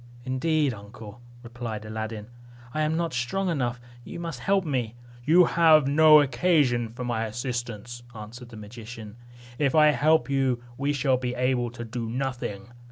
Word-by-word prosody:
"Indeed, 145 +2 +1
uncle," 105 +2 -11 0.2
replied 120 -3 -6
Aladdin, 110 0 -5 0.5
"I 155 - -1
am 155 +1 0
not 170 -2 -2
strong 150 +11 -1
enough; 125 -6 -1 0.2
you 170 - -8
must 165 -7 -5
help 195 +5 +1
me." 125 -6 -2 0.3
"You 170 +3 +6
have 160 -3 +5
no 155 +1 +7
occasion 130 -4 +2
for 120 +3 -7
my 115 -2 -1
assistance," 120 0 -5
answered 115 +3 -10
the 115 - -11
magician; 110 0 -10 0.4
"if 140 -1 +1
I 150 -1 +6
help 155 +2 +3
you, 135 -3 0
we 140 +3 -1
shall 135 -2 +1
be 125 -1 -3
able 125 -1 0
to 120 0 -8
do 115 0 -5
nothing. 120 -5 -4
125 Hz, 160 wpm, -26 LUFS, 115-150 Hz, 0.5 s, no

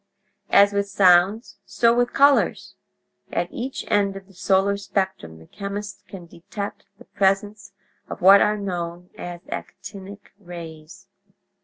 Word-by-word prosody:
"As 200 0 +5
with 200 0 -1
sounds, 195 +3 +3
so 230 -1 +2
with 245 0 +1
colors. 280 0 +2 0.6
At - - -2
each 260 +2 -5
end 200 -1 +1
of 195 0 -9
the 195 - -21
solar 195 +2 +1
spectrum 190 - -3
the 80 - -16
chemist 200 - -7
can 185 -2 -10
detect 200 +5 -8
the - - -16
presence 200 +1 -1 0.4
of - - -7
what 195 +2 +7
are 210 0 +2
known 175 -3 -5
as 175 -1 -8
'actinic' 200 0 -9
rays. 170 0 -11
195 Hz, 135 wpm, -22 LUFS, 180-205 Hz, 0.6 s, what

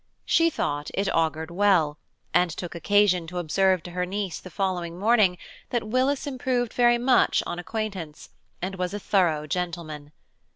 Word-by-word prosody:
She 335 0 +4
thought 145 - -2
it 195 +1 0
augured 160 0 0
well, 175 -6 +2 0.3
and 180 0 +4
took 170 +1 -6
occasion 185 0 +2
to 180 +2 -6
observe 185 +1 +2
to 175 - -8
her 180 +1 -2
niece 190 -1 -3
the 185 - -11
following 180 -3 -2
morning 205 -3 +3 0.3
that 240 -3 -1
Willis 260 +5 +1
improved 255 -3 -1
very 240 -1 +4
much 250 +1 +3
on 175 - -4
acquaintance, 185 -5 -5 0.3
and 190 +1 -3
was 180 +2 -2
a - - -3
thorough 170 -7 +1
gentlemen. 155 -3 -4
185 Hz, 160 wpm, -25 LUFS, 170-215 Hz, 0.3 s, She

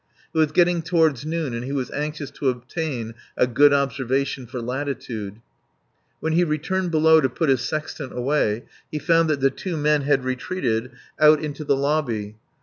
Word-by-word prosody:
It - - -4
was 155 -2 +3
getting 175 -1 +3
toward 160 -6 +2
noon 160 -5 -2
and 115 +1 -3
he 130 - -5
was 135 -3 -2
anxious 150 -1 -4
to 135 - -1
obtain 125 -1 -4 0.2
a - - +4
good 140 +4 +5
observation 135 -2 0
for 125 +2 -6
latitude. 120 -5 -4 0.8
When 160 0 -1
he 175 +2 +4
returned 175 +4 -1
below 160 0 +5
to 130 - +1
put 145 +5 -1
his 130 -2 +3
sextant 150 -2 -4
away 125 -4 0 0.3
he 155 - -2
found 165 +1 +3
that 145 -3 0
the 135 0 +4
two 175 +4 -4
men 150 0 +2
had 135 -2 +1
retreated 125 -2 -2 0.3
out 155 0 +7
into 150 0 -5
the 140 - +2
lobby. 135 -8 -1
140 Hz, 175 wpm, -23 LUFS, 125-155 Hz, 0.8 s, out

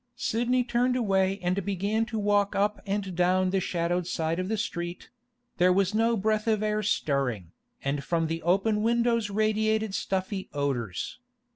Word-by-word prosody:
Sidney 245 +2 +1
turned 245 +1 +1
away 195 -5 +1
and 185 +2 0
began 205 +4 -1
to 230 -2 -4
walk 205 -1 +2
up 205 +1 +1
and 195 -2 -2
down 185 +1 +2
the 195 - +2
shadowed 175 -1 -1
side 165 0 -1
of 185 - -2
the 220 - 0
street; 175 -4 -4 0.5
there 180 +1 +5
was 195 +1 +2
no 230 +1 +2
breath 215 +2 0
of 215 -1 +2
air 215 0 0
stirring, 135 - -1 0.3
and 140 +1 -1
from 165 +1 0
the 165 +1 -3
open 200 +5 +2
windows 230 -1 +2
radiated 215 0 +1
stuffy 190 0 -2
odours. 135 - -2
195 Hz, 160 wpm, -27 LUFS, 175-220 Hz, 0.5 s, there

